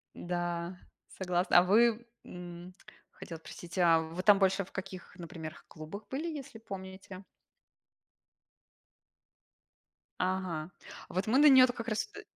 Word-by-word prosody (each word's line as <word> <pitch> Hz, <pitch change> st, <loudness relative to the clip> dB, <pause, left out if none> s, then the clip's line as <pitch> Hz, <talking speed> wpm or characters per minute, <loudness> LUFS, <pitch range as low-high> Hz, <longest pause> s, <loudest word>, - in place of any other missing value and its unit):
Да, 175 Hz, 0 st, -3 dB, 0.4 s
согласна. 180 Hz, -1 st, +3 dB
А -, -, +4 dB
вы? 230 Hz, +4 st, +4 dB, 0.2 s
М, 175 Hz, 0 st, -9 dB, 0.4 s
хотела 165 Hz, -2 st, -9 dB
спросить, 170 Hz, +2 st, -10 dB
а 170 Hz, -2 st, +5 dB
вы 160 Hz, +2 st, -4 dB
там 205 Hz, 0 st, +6 dB
больше 195 Hz, 0 st, +3 dB
в -, -, -19 dB
каких, 190 Hz, -1 st, -8 dB
например, 165 Hz, -2 st, -8 dB
клубах 160 Hz, +7 st, -9 dB
были, 290 Hz, +6 st, -3 dB
если 280 Hz, -7 st, -7 dB
помните? 190 Hz, -2 st, -9 dB, 3.0 s
Ага. 185 Hz, -3 st, -2 dB, 0.4 s
Вот 185 Hz, +3 st, -2 dB
мы 235 Hz, +4 st, +3 dB
на 295 Hz, -, +6 dB
нее-то, 255 Hz, -2 st, +7 dB
как 230 Hz, -1 st, -7 dB
раз 215 Hz, 0 st, -1 dB
от -, -, -11 dB
и -, -, -9 dB
185 Hz, 130 wpm, -31 LUFS, 175-215 Hz, 3.0 s, нее-то